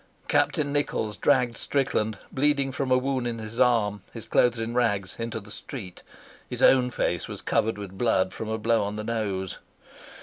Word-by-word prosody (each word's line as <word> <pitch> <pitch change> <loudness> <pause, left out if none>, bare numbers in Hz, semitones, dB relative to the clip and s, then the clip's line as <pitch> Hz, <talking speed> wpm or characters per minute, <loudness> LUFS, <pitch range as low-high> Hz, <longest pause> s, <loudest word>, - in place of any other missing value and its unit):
Captain 145 -1 +2
Nichols 110 -7 -1
dragged 120 +5 +2
Strickland, 110 -6 0
bleeding 140 0 +2
from 135 0 -2
a 130 - +5
wound 130 -1 -1
in 115 -1 -3
his 110 +2 -7
arm, 110 -5 +3
his 115 - -9
clothes 120 -1 +3
in 115 +1 -3
rags, 105 -6 0
into 115 0 -3
the 105 +1 -13
street. 100 -7 -8 0.5
His - - -3
own 125 -1 +6
face 90 -7 -1
was - - -8
covered 110 -1 +1
with 95 -2 -8
blood 95 -6 +2
from 110 - -5
a 110 - -1
blow 115 +1 +2
on 100 +1 -3
the 105 - -4
nose. 105 -5 -2
115 Hz, 180 wpm, -26 LUFS, 105-125 Hz, 0.5 s, own